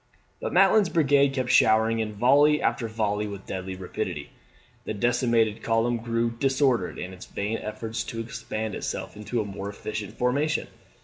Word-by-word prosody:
But - - -3
Maitland's 210 -5 +5
brigade 140 -4 +3
kept 130 -2 0
showering 110 +1 +4
in 110 -1 -1
volley 140 +7 +4
after 115 - 0
volley 105 -1 -1
with 100 -1 -8
deadly 95 0 -5
rapidity. 90 -1 -5 0.5
The 110 - -3
decimated 120 -1 +1
column 115 +1 +1
grew 115 0 -1
disordered 130 -4 +1
in 90 +1 -6
its 90 - -11
vain 105 +3 -3
efforts 110 +2 -4
to 115 - -6
expand 110 -1 -4
itself - - -4
into 105 +3 -2
a - - -4
more 100 0 -6
efficient 105 0 -6
formation. 140 +5 0
115 Hz, 160 wpm, -26 LUFS, 105-125 Hz, 0.5 s, Maitland's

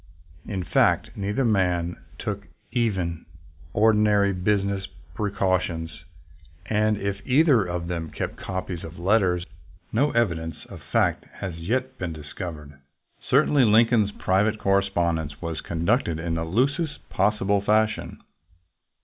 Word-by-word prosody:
In 95 -4 -3
fact, - - +2
neither 105 +6 -1
man 90 -5 +1 0.2
took 100 -3 -4 0.2
even 95 -9 -1 0.4
ordinary 105 -1 +4
business 100 +1 0 0.3
precautions, 95 -4 -1 0.7
and 105 0 +1
if 100 0 -2
either 135 -2 +4
of 85 -1 -3
them 85 -2 -3
kept - - -4
copies 95 -2 -5
of 80 +1 -9
letters, 90 -1 +2 0.5
no 140 +7 +3
evidence 85 - -1
of - - -9
that - - -20
fact - - +2
has 95 -3 -5
yet 130 +9 -2
been 90 -2 -3
discovered. 75 -1 -8 0.5
Certainly 140 -1 +4
Lincoln's 110 -1 +4
private 105 +3 +1
correspondence 85 -7 0
was 85 -2 -4
conducted 85 - 0
in 80 +1 -3
the 80 0 -1
loosest 140 - -1
possible 100 -1 +1
fashion. 110 +1 0
100 Hz, 120 wpm, -25 LUFS, 85-110 Hz, 0.7 s, ordinary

